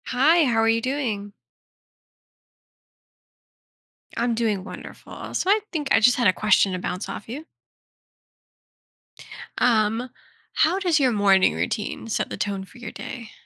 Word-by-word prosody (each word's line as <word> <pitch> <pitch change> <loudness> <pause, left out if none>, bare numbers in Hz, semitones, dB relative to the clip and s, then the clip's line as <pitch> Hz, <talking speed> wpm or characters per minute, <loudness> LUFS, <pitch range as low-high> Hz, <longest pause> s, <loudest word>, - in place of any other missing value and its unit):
Hi, 310 +7 +4
how 240 -5 +1
are 225 - +2
you 225 0 +2
doing? 225 -6 -3 2.9
I'm 235 0 0
doing 215 -5 -1
wonderful - - -10
so, 370 - -1
I 420 +2 +5
think 300 -4 -3
I, - - +6
just, 245 +3 +4
had 240 -3 +3
a 185 - +4
question 200 -2 +2
to 185 - -3
bounce 180 +2 -4
off 210 - -8
you. 290 +7 -7 2.1
Um, 225 +1 +1 0.4
how 350 +5 +2
does 350 -5 +2
your 260 -3 +3
morning 195 -3 +3
routine 215 +1 -3
set 225 - -2
the - - -6
tone 200 -2 -3
for 220 - -17
your 240 -3 -8
day? 235 -5 -8
230 Hz, 145 wpm, -23 LUFS, 205-265 Hz, 2.9 s, I